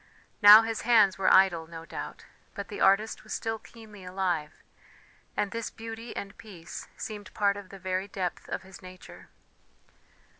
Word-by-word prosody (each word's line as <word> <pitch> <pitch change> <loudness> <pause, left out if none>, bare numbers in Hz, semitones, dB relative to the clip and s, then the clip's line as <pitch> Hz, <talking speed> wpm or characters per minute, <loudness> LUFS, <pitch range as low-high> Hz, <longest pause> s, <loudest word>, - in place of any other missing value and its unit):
Now 210 +1 +10
his 225 0 -3
hands 215 -5 +4
were 190 - +3
idle, 175 -4 +4
no 165 0 -9
doubt, - - -8 0.3
but 200 -1 -6
the 205 - -6
artist 210 +3 +3
was 215 - -7
still 225 0 -3
keenly 215 -4 -14
alive, 180 -5 -3 0.7
and 205 - 0
this 230 -1 -4
beauty 225 +1 -8
and 200 0 -6
peace 180 -7 -10
seemed 210 -2 -7
part 200 -1 +2
of 200 -2 -9
the 195 - -10
very 190 0 -3
depth 185 -3 -4
of - - -4
his 190 0 -13
nature. 185 0 -13
200 Hz, 160 wpm, -28 LUFS, 185-215 Hz, 0.7 s, Now